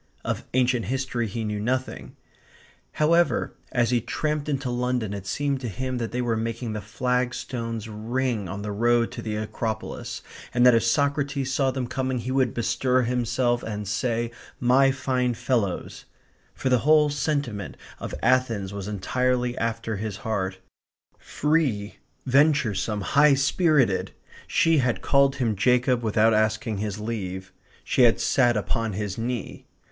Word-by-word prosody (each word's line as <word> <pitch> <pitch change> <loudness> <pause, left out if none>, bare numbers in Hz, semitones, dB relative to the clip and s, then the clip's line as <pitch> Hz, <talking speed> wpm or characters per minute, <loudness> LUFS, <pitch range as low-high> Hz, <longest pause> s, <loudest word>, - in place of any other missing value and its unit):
Of - - -2
ancient 125 -2 +2
history 130 -2 -2
he 110 +3 -4
knew 105 -1 -2
nothing. 130 +4 -3 0.8
However, 170 +3 +2 0.2
as 120 -1 +1
he 120 -1 +2
tramped 150 +4 -2
into 135 -3 -1
London 125 -4 -1
it 100 -1 -6
seemed 140 +4 -1
to 125 - -3
him 130 +4 -3
that 115 -1 -3
they 125 +1 -1
were 115 -2 0
making 115 +1 -3
the 105 - -4
flagstones 120 0 -2
ring 110 -1 -2
on 100 +3 -5
the 105 - -3
road 120 +2 +2
to - - -6
the 110 -2 -3
Acropolis, 110 +1 -4 0.3
and 120 0 +5
that 125 - +8
if 115 - +3
Socrates 140 +1 0
saw 135 0 +2
them 130 -1 -2
coming 130 +1 -2
he 125 +2 -4
would 130 -3 +2
bestir 125 +2 +1
himself 120 0 0
and 105 -2 -5
say 115 +3 -1 0.3
"my 130 +2 +4
fine 130 -2 0
fellows," 120 -6 -2 0.5
for 130 - -1
the 125 -1 +4
whole 150 +2 +4
sentiment 140 - -2 0.2
of - - -5
Athens 115 -7 +1
was 100 -1 -5
entirely 125 +4 0
after 115 -1 -2
his 105 -1 -4
heart; 95 -4 -1 0.6
free, 140 -10 0 0.3
venturesome, 130 -7 +2
high 145 +7 +4
spirited.... 140 - +2 0.4
She 165 -2 +3
had 125 -3 0
called 140 0 +3
him 120 -6 0
Jacob 125 +3 +2
without 110 0 +3
asking 110 0 0
his 105 0 -3
leave. 95 -4 -5 0.3
She - - +1
had 120 -2 +5
sat 120 -4 +3
upon 110 +2 -1
his 100 +1 -4
knee. 120 -2 -4
120 Hz, 150 wpm, -25 LUFS, 110-130 Hz, 0.8 s, that